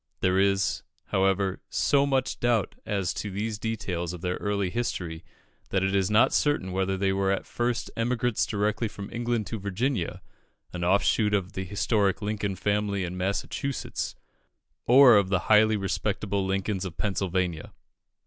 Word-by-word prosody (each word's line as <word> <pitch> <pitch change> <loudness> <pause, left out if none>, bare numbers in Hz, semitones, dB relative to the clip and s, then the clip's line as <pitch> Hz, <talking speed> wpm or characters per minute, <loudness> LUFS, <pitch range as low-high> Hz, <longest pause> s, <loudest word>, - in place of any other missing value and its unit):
There 95 0 +3
is, 100 -1 +2 0.3
however, 95 0 +1
so 140 0 +2
much 135 -2 0
doubt 120 -3 +1
as 95 -5 -1
to 105 - -4
these 105 +2 -3
details 90 -6 -3
of 90 - -8
their 90 0 -2
early 100 -3 -1
history, 90 -9 -3 0.5
that 95 -1 +1
it 95 0 0
is 95 -1 +2
not 105 +2 +4
certain 145 -11 +1
whether 95 +1 0
they 95 0 +1
were 95 0 +1
at 100 - -1
first 120 0 -2
emigrants 115 -5 0
directly 105 +4 0
from 100 -1 -8
England 120 -2 -1
to 105 +4 -5
Virginia, 100 +1 -2 0.5
an 90 -1 -4
offshoot 100 +3 +3
of 95 -2 -2
the 95 - -4
historic 100 0 +1
Lincoln 105 -2 -2
family 100 -1 0
in 90 0 -4
Massachusetts, 100 +8 -3 0.7
or 125 -2 +8
of 100 -2 +2
the 95 -3 +1
highly 110 0 +6
respectable 100 0 -1
Lincolns 95 0 -1
of 90 -4 -6
Pennsylvania. 90 -5 -1
100 Hz, 155 wpm, -27 LUFS, 95-110 Hz, 0.7 s, or